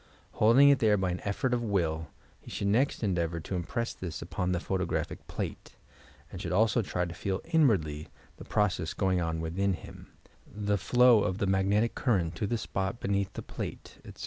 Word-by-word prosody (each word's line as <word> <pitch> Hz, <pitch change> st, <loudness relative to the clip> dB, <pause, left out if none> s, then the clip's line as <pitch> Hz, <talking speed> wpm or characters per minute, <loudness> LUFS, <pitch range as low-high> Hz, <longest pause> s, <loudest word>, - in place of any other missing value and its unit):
Holding 125 Hz, +6 st, +6 dB
it 140 Hz, -, +5 dB
there 105 Hz, -2 st, +4 dB
by 95 Hz, -2 st, 0 dB
an 90 Hz, -, -3 dB
effort 115 Hz, +5 st, 0 dB
of 120 Hz, -, +1 dB
will, 85 Hz, -8 st, -1 dB, 0.3 s
he -, -, -13 dB
should -, -, -3 dB
next 120 Hz, +4 st, +1 dB
endeavour 85 Hz, -4 st, 0 dB
to 90 Hz, -, -6 dB
impress 115 Hz, +7 st, -2 dB
this 90 Hz, -3 st, -6 dB
upon 90 Hz, 0 st, -2 dB
the 90 Hz, -, 0 dB
photographic 95 Hz, -1 st, -3 dB
plate, -, -, -6 dB, 0.6 s
and 90 Hz, -, -7 dB
should -, -, -4 dB
also 110 Hz, +4 st, +3 dB
try 90 Hz, -3 st, -2 dB
to 85 Hz, -, -6 dB
feel 95 Hz, +2 st, -2 dB
inwardly 95 Hz, -, +2 dB, 0.3 s
the -, -, -10 dB
process 90 Hz, -6 st, 0 dB
going 95 Hz, -2 st, +1 dB
on 80 Hz, -1 st, -2 dB
within 95 Hz, +4 st, 0 dB
him 85 Hz, -, -10 dB, 0.2 s
— -, -, -31 dB, 0.2 s
the 100 Hz, -1 st, +2 dB
flow 125 Hz, +1 st, +5 dB
of 95 Hz, -3 st, -1 dB
the 100 Hz, -, 0 dB
magnetic 100 Hz, +4 st, +2 dB
current 95 Hz, -10 st, 0 dB
to 105 Hz, -, -1 dB
the 120 Hz, -, 0 dB
spot 100 Hz, +1 st, -3 dB
beneath 100 Hz, -1 st, -1 dB
the -, -, -6 dB
plate, -, -, -7 dB
etc. -, -, -12 dB
95 Hz, 195 wpm, -29 LUFS, 90-110 Hz, 0.6 s, Holding